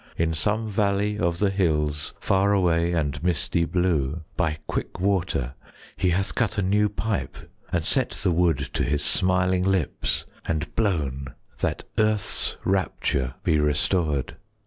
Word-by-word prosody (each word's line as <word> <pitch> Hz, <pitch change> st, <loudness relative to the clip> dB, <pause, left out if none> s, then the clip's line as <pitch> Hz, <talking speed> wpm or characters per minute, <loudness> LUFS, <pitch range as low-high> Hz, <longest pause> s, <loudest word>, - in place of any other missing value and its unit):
In 80 Hz, 0 st, +1 dB
some 105 Hz, +8 st, 0 dB
valley 105 Hz, 0 st, 0 dB
of 85 Hz, -3 st, +1 dB
the 100 Hz, +1 st, +2 dB
hills 75 Hz, -6 st, 0 dB
Far 100 Hz, +1 st, +2 dB
away 85 Hz, -3 st, +2 dB
and 80 Hz, -3 st, -1 dB
misty 85 Hz, -1 st, +1 dB
blue, 85 Hz, -4 st, 0 dB
By 75 Hz, 0 st, 0 dB
quick -, -, -4 dB
water 90 Hz, -9 st, 0 dB, 0.4 s
he 90 Hz, -, +1 dB
hath 95 Hz, +3 st, 0 dB
cut 110 Hz, -2 st, 0 dB
A 100 Hz, -, +1 dB
new 105 Hz, +3 st, +3 dB
pipe, 105 Hz, 0 st, -3 dB, 0.3 s
and 85 Hz, -2 st, 0 dB
set -, -, +2 dB
the -, -, 0 dB
wood 85 Hz, 0 st, +3 dB
30 -, -, -5 dB
To -, -, 0 dB
his 75 Hz, +1 st, +1 dB
smiling 90 Hz, +2 st, +3 dB
lips, 95 Hz, -5 st, 0 dB, 0.2 s
and 80 Hz, -2 st, -2 dB
blown, 70 Hz, -, -1 dB, 0.2 s
That -, -, -1 dB, 0.2 s
earth's 110 Hz, -1 st, 0 dB
rapture 70 Hz, -9 st, 0 dB
be 75 Hz, -, +3 dB
restored. 75 Hz, -1 st, 0 dB
90 Hz, 145 wpm, -25 LUFS, 75-100 Hz, 0.4 s, new